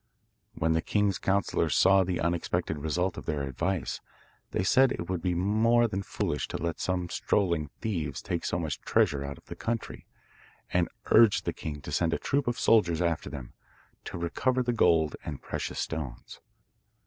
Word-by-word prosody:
When 80 Hz, +1 st, +1 dB
the 80 Hz, -, +1 dB
king's 100 Hz, -1 st, +1 dB
counsellors 100 Hz, +1 st, +1 dB
saw 95 Hz, 0 st, +6 dB
the 90 Hz, -1 st, -2 dB
unexpected 85 Hz, -2 st, -1 dB
result 85 Hz, +5 st, -1 dB
of -, -, -13 dB
their 75 Hz, -3 st, -1 dB
advice, 85 Hz, +7 st, -2 dB, 0.5 s
they -, -, -1 dB
said 130 Hz, +7 st, +5 dB
it 85 Hz, -, -4 dB
would 90 Hz, -3 st, -2 dB
be 90 Hz, 0 st, 0 dB
more 110 Hz, +6 st, +3 dB
than 100 Hz, -2 st, -3 dB
foolish 75 Hz, -7 st, -2 dB
to -, -, -4 dB
let 85 Hz, 0 st, -3 dB
some 90 Hz, -1 st, -1 dB
strolling 85 Hz, -7 st, 0 dB
thieves 80 Hz, -, -2 dB
take 85 Hz, -, -2 dB
so -, -, -1 dB
much 80 Hz, -5 st, -3 dB
treasure 70 Hz, -1 st, +2 dB
out 70 Hz, 0 st, -6 dB
of -, -, -19 dB
the -, -, -8 dB
country, 115 Hz, -1 st, -4 dB, 0.7 s
and 90 Hz, -1 st, +2 dB, 0.2 s
urged 115 Hz, -3 st, +6 dB
the -, -, -1 dB
king 75 Hz, -2 st, -6 dB
to -, -, -7 dB
send 85 Hz, -1 st, +1 dB
a -, -, -1 dB
troop 140 Hz, -1 st, -1 dB
of 120 Hz, -1 st, -1 dB
soldiers 90 Hz, -8 st, +4 dB
after 85 Hz, -3 st, 0 dB
them, 65 Hz, -5 st, -8 dB, 0.5 s
to -, -, -5 dB
recover 125 Hz, +10 st, 0 dB
the 120 Hz, 0 st, 0 dB
gold 80 Hz, -8 st, +3 dB
and 75 Hz, -3 st, -6 dB
precious -, -, -4 dB
stones. 70 Hz, -7 st, -5 dB
85 Hz, 180 wpm, -29 LUFS, 80-100 Hz, 0.7 s, saw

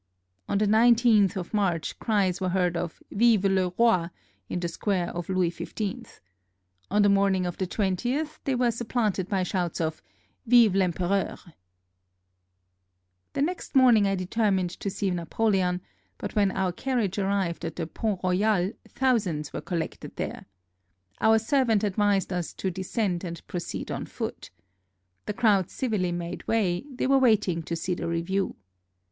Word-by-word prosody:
[On -, -, +1 dB
the 210 Hz, -, +2 dB
19th 220 Hz, -2 st, +5 dB
of 185 Hz, 0 st, -5 dB
March 185 Hz, -6 st, 0 dB
cries 200 Hz, -5 st, +1 dB
were 185 Hz, -, 0 dB
heard 180 Hz, -1 st, +1 dB
of 170 Hz, -1 st, -4 dB
" -, -, -44 dB
Vive 225 Hz, -2 st, +4 dB
le 190 Hz, -2 st, +2 dB
Rot! 205 Hz, -8 st, +3 dB, 0.2 s
" -, -, -40 dB
in -, -, -2 dB
the 175 Hz, -, -2 dB
square 180 Hz, +1 st, -1 dB
of 175 Hz, 0 st, -6 dB
Louis 185 Hz, -2 st, +1 dB
XV. 200 Hz, +2 st, -6 dB, 0.7 s
On 205 Hz, +2 st, +3 dB
the -, -, +5 dB
morning 195 Hz, -2 st, +3 dB
of 175 Hz, -1 st, -4 dB
the 190 Hz, -, -1 dB
20th 245 Hz, -, -1 dB
they 270 Hz, -, 0 dB
were 245 Hz, -1 st, +2 dB
supplanted 220 Hz, -5 st, -1 dB
by 195 Hz, -2 st, +1 dB
shouts 180 Hz, -2 st, -2 dB
of 160 Hz, -1 st, -2 dB, 0.2 s
" -, -, -42 dB
Vive 235 Hz, -2 st, +6 dB
VEmpereur! 185 Hz, +1 st, 0 dB, 0.9 s
"] 90 Hz, 0 st, -50 dB
The 275 Hz, -, +1 dB
next 345 Hz, -1 st, -4 dB
morning 240 Hz, -6 st, +6 dB
I 195 Hz, -, +1 dB
determined 190 Hz, -1 st, 0 dB
to 200 Hz, -, -4 dB
see 195 Hz, 0 st, -1 dB
Napoleon, 180 Hz, +1 st, 0 dB, 0.4 s
but -, -, -6 dB
when 205 Hz, -2 st, +3 dB
our 190 Hz, -1 st, -1 dB
carriage 215 Hz, -2 st, -1 dB
arrived 195 Hz, -4 st, -1 dB
at 165 Hz, -1 st, -4 dB
the 165 Hz, -, -3 dB
Pont 200 Hz, +3 st, -3 dB
Royal 185 Hz, +1 st, +2 dB, 0.2 s
thousands 195 Hz, -, 0 dB
were -, -, -4 dB
collected 165 Hz, -3 st, -5 dB
there. -, -, -5 dB, 0.7 s
Our 220 Hz, 0 st, +5 dB
servant 225 Hz, -2 st, +2 dB
advised 200 Hz, -2 st, +1 dB
us 175 Hz, -2 st, -3 dB
to 190 Hz, -, -3 dB
descend 190 Hz, 0 st, -2 dB
and 170 Hz, -2 st, -7 dB
proceed 175 Hz, -1 st, -5 dB
on -, -, -4 dB
foot. -, -, -6 dB, 0.8 s
The 210 Hz, -, -1 dB
crowd 205 Hz, -6 st, +3 dB
civilly 210 Hz, -9 st, -1 dB
made 175 Hz, 0 st, -5 dB
way: 200 Hz, -2 st, +1 dB
they 255 Hz, -, -2 dB
were 270 Hz, +1 st, +4 dB
waiting 210 Hz, -9 st, +3 dB
to 165 Hz, +1 st, -4 dB
see 175 Hz, +2 st, -2 dB
the 175 Hz, -, -4 dB
review. 170 Hz, +4 st, -1 dB
190 Hz, 165 wpm, -26 LUFS, 175-220 Hz, 0.9 s, Vive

